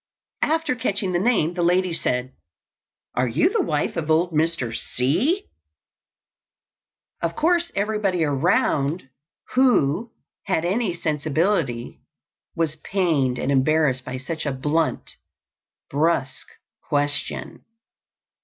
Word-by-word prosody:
After 320 Hz, -3 st, +1 dB
catching 205 Hz, -5 st, -1 dB
the 175 Hz, -, +1 dB
name 190 Hz, -6 st, +2 dB
the 175 Hz, -, -2 dB
lady 180 Hz, +1 st, +2 dB
said: 125 Hz, -4 st, -1 dB, 0.8 s
"Are 125 Hz, +1 st, +1 dB
you 300 Hz, -, +2 dB
the 450 Hz, -, +2 dB
wife 150 Hz, -, -1 dB
of 160 Hz, -2 st, -3 dB
old 165 Hz, +3 st, +3 dB
Mr. 155 Hz, -7 st, 0 dB
C 185 Hz, -, 0 dB, 0.7 s
?" -, -, -56 dB
Of 170 Hz, 0 st, -1 dB
course 340 Hz, +1 st, +2 dB
everybody 200 Hz, -4 st, 0 dB
around 145 Hz, -, +1 dB, 0.4 s
who 235 Hz, -, +3 dB, 0.4 s
had 180 Hz, -5 st, 0 dB
any 200 Hz, +2 st, +1 dB
sensibility 155 Hz, -, -1 dB, 0.6 s
was 160 Hz, -2 st, -1 dB
pained 155 Hz, -9 st, 0 dB
and 140 Hz, -, -1 dB
embarrassed 135 Hz, -1 st, +2 dB
by 130 Hz, 0 st, -5 dB
such 155 Hz, +4 st, -5 dB
a -, -, +1 dB
blunt, 150 Hz, +5 st, -1 dB, 0.7 s
brusque 145 Hz, -2 st, 0 dB, 0.4 s
question. 145 Hz, 0 st, -1 dB
165 Hz, 110 wpm, -23 LUFS, 140-195 Hz, 0.8 s, old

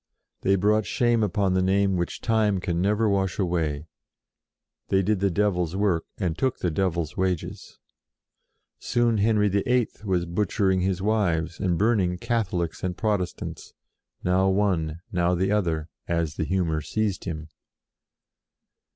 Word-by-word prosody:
They 95 Hz, -, +3 dB
brought 105 Hz, +2 st, +2 dB
shame 120 Hz, -2 st, +2 dB
upon 100 Hz, -2 st, +1 dB
their 95 Hz, -, +2 dB
name 95 Hz, +1 st, +2 dB
which 85 Hz, -1 st, -3 dB
Time 110 Hz, -4 st, +2 dB
can 85 Hz, -1 st, -1 dB
never 105 Hz, +3 st, +2 dB
wash 95 Hz, -3 st, 0 dB
away; 80 Hz, -6 st, -1 dB, 1.0 s
they 95 Hz, 0 st, +2 dB
did 105 Hz, +1 st, +1 dB
the 100 Hz, +1 st, +2 dB
Devil's 90 Hz, -2 st, 0 dB
work, 95 Hz, -5 st, +1 dB
and 90 Hz, -5 st, -1 dB
took 130 Hz, +6 st, 0 dB
the 90 Hz, -, -1 dB
Devil's 85 Hz, -3 st, -1 dB
wages. 90 Hz, -3 st, -3 dB, 1.0 s
Soon 120 Hz, -2 st, +1 dB
Henry 105 Hz, 0 st, +3 dB
VIII. 115 Hz, +5 st, +1 dB
was 90 Hz, -4 st, 0 dB
butchering 95 Hz, +1 st, +1 dB
his 95 Hz, 0 st, -1 dB
wives 85 Hz, -6 st, 0 dB
and 90 Hz, -3 st, 0 dB
burning 100 Hz, -4 st, +2 dB
Catholics 95 Hz, -7 st, -2 dB
and 90 Hz, -1 st, -2 dB
Protestants, 105 Hz, -5 st, -3 dB, 0.5 s
now 95 Hz, +1 st, +3 dB
one, 90 Hz, -5 st, 0 dB
now 90 Hz, 0 st, +1 dB
the 95 Hz, +3 st, 0 dB
other, 85 Hz, -7 st, 0 dB, 0.2 s
as 85 Hz, -3 st, 0 dB
the 80 Hz, -, -2 dB
humour 85 Hz, -4 st, 0 dB
seized 105 Hz, +5 st, -2 dB
him. 80 Hz, -2 st, -5 dB
95 Hz, 140 wpm, -25 LUFS, 85-105 Hz, 1.0 s, They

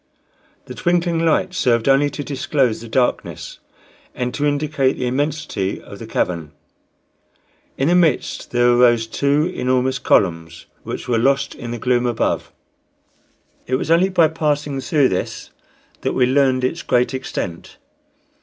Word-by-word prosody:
The -, -, -8 dB
twinkling 175 Hz, -1 st, 0 dB
lights 180 Hz, +3 st, +1 dB
served 120 Hz, -1 st, +2 dB
only 135 Hz, +2 st, +4 dB
to 145 Hz, -, -6 dB
disclose 135 Hz, -4 st, -1 dB
the 115 Hz, -, -9 dB
darkness 125 Hz, +2 st, -2 dB, 0.6 s
and 125 Hz, 0 st, -3 dB
to 145 Hz, 0 st, 0 dB
indicate 145 Hz, -2 st, +1 dB
the 125 Hz, -, -4 dB
immensity 140 Hz, -6 st, -2 dB
of -, -, -12 dB
the -, -, -8 dB
cavern. 85 Hz, -4 st, -2 dB, 1.2 s
In 135 Hz, -, +1 dB
the 175 Hz, -, +3 dB
midst 170 Hz, -7 st, +1 dB
there 120 Hz, 0 st, +3 dB
arose 120 Hz, -2 st, +4 dB
two 140 Hz, +6 st, +1 dB
enormous 130 Hz, 0 st, 0 dB
columns, 85 Hz, -7 st, 0 dB, 0.2 s
which -, -, -6 dB
were 120 Hz, -2 st, +1 dB
lost 140 Hz, +3 st, +1 dB
in 120 Hz, -, -8 dB
the 120 Hz, -, -4 dB
gloom 125 Hz, +1 st, +1 dB
above. 120 Hz, -1 st, -1 dB, 1.2 s
It 130 Hz, -, +1 dB
was 145 Hz, -, -2 dB
only 175 Hz, +3 st, +4 dB
by 175 Hz, -4 st, +4 dB
passing 150 Hz, -3 st, -1 dB
through 135 Hz, +1 st, +2 dB
this 90 Hz, -, -4 dB, 0.5 s
that -, -, -1 dB
we 125 Hz, -, +3 dB
learned 130 Hz, -1 st, +2 dB
its 130 Hz, +7 st, -1 dB
great 125 Hz, +1 st, +1 dB
extent. 90 Hz, -9 st, -5 dB
130 Hz, 145 wpm, -20 LUFS, 120-150 Hz, 1.2 s, only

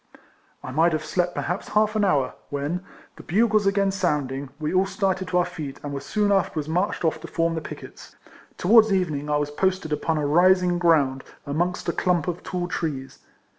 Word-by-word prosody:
I 130 Hz, -, -6 dB
might 165 Hz, +5 st, +3 dB
have 155 Hz, 0 st, -2 dB
slept 175 Hz, +2 st, -1 dB
perhaps 175 Hz, +4 st, -3 dB
half 215 Hz, 0 st, +1 dB
an 215 Hz, -, +2 dB
hour, 145 Hz, -10 st, +2 dB, 0.2 s
when, 145 Hz, +5 st, -2 dB, 0.4 s
the -, -, -9 dB
bugles 215 Hz, +2 st, +2 dB
again 195 Hz, 0 st, +2 dB
sounding, 145 Hz, -7 st, -1 dB
we 155 Hz, +2 st, -2 dB
all 190 Hz, +1 st, +3 dB
started 190 Hz, -2 st, -1 dB
to 180 Hz, -, 0 dB
our 175 Hz, -, +3 dB
feet, 145 Hz, -4 st, -7 dB
and 145 Hz, -1 st, -5 dB
were 140 Hz, -, -3 dB
soon 205 Hz, +6 st, 0 dB
afterwards 170 Hz, -6 st, 0 dB
marched 175 Hz, +2 st, -1 dB
off 160 Hz, -1 st, 0 dB
to 165 Hz, -, -8 dB
form 165 Hz, 0 st, 0 dB
the 160 Hz, -, -3 dB
picquets. -, -, -10 dB, 0.4 s
Towards 220 Hz, +3 st, +5 dB
evening 155 Hz, -7 st, 0 dB
I 150 Hz, -, +2 dB
was 145 Hz, 0 st, -2 dB
posted 185 Hz, -1 st, 0 dB
upon 155 Hz, +2 st, -1 dB
a 150 Hz, -, -1 dB
rising 180 Hz, +3 st, +4 dB
ground, 145 Hz, -6 st, +3 dB, 0.2 s
amongst 175 Hz, +6 st, -2 dB
a 170 Hz, -, +1 dB
clump 180 Hz, -3 st, +1 dB
of 175 Hz, -1 st, -3 dB
tall 180 Hz, -1 st, -3 dB
trees. 145 Hz, -7 st, -4 dB
175 Hz, 195 wpm, -24 LUFS, 150-190 Hz, 0.4 s, Towards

